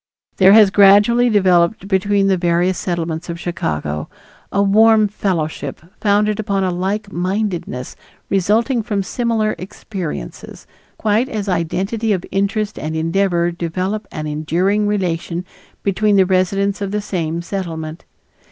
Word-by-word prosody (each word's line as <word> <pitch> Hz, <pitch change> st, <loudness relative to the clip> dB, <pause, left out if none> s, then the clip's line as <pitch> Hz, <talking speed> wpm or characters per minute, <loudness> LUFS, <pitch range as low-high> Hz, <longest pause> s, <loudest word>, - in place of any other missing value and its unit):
There 190 Hz, +1 st, +7 dB
has 210 Hz, -3 st, +7 dB
gradually 205 Hz, +5 st, +5 dB
developed 185 Hz, -2 st, +2 dB
between 200 Hz, +1 st, +1 dB
the 195 Hz, -1 st, +3 dB
various 175 Hz, +1 st, +1 dB
Settlements 170 Hz, -1 st, -3 dB
of 170 Hz, 0 st, -5 dB
Chicago 75 Hz, -, -3 dB, 0.4 s
a 200 Hz, -, +2 dB
warm 215 Hz, +2 st, +5 dB
fellowship 180 Hz, -6 st, -3 dB, 0.2 s
founded 210 Hz, 0 st, +1 dB
upon 200 Hz, -2 st, -1 dB
a 185 Hz, -, 0 dB
like 195 Hz, +4 st, -2 dB
mindedness 180 Hz, -8 st, -3 dB, 0.3 s
resulting 220 Hz, +6 st, +1 dB
from 205 Hz, -3 st, -2 dB
similar 225 Hz, 0 st, -1 dB
experiences, 180 Hz, -, -7 dB, 0.3 s
quite 220 Hz, +4 st, +1 dB
as 210 Hz, -4 st, -4 dB
identity 195 Hz, +5 st, -1 dB
of 185 Hz, -2 st, -3 dB
interest 200 Hz, +2 st, -1 dB
and 155 Hz, +1 st, -4 dB
endeavor 170 Hz, +1 st, +1 dB
develop 185 Hz, +5 st, -3 dB
an 155 Hz, -1 st, -5 dB
enduring 175 Hz, +8 st, 0 dB
relation 175 Hz, -3 st, -2 dB, 0.4 s
between 205 Hz, +1 st, +2 dB
the 190 Hz, -1 st, +5 dB
residents 195 Hz, +2 st, 0 dB
of 200 Hz, -, -2 dB
the 210 Hz, +1 st, -1 dB
same 170 Hz, -4 st, -3 dB
Settlement. 165 Hz, -4 st, -5 dB
195 Hz, 130 wpm, -18 LUFS, 170-210 Hz, 0.4 s, There